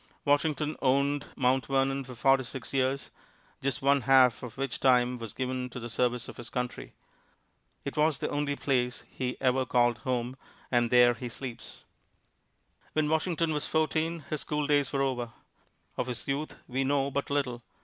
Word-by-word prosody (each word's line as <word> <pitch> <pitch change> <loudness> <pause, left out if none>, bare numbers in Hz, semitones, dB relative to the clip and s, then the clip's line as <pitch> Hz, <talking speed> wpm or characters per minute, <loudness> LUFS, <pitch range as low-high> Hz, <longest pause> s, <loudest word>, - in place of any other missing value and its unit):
Washington 150 +1 +1
owned 140 +2 +2
Mount 130 0 +2
Vernon 135 0 +1
for 125 -1 -10
forty 135 +3 +4
six 130 +2 -6
years, 135 +1 0 0.5
just 135 -1 -1
one 140 0 +4
half 130 -1 +5
of 125 -1 -8
which 135 -1 -2
time 125 -2 +3
was 115 -2 -6
given 130 +1 -3
to 125 - -7
the 120 -1 -6
service 125 0 0
of - - -10
his 120 -1 -7
country. 125 -1 -4 0.9
It 140 - -4
was 150 -1 +3
the - - -2
only 145 -1 0
place 125 -3 0
he 125 -1 -4
ever 130 0 +2
called 120 -3 +2
"home," 125 +1 -2 0.3
and 120 -1 +3
there 125 0 +6
he 120 +1 -6
sleeps. 120 -1 -8 1.1
When 155 -1 +1
Washington 160 0 +1
was 150 0 -1
fourteen, 160 +1 0
his 150 0 -3
schooldays 145 -2 +1
were 135 -1 +1
over. 125 -4 -2 0.6
Of - - -1
his 125 -2 -4
youth 140 +3 -2
we 130 +1 -1
know 140 0 +1
but 140 +1 -2
little. 135 -4 -1
135 Hz, 170 wpm, -29 LUFS, 125-140 Hz, 1.1 s, there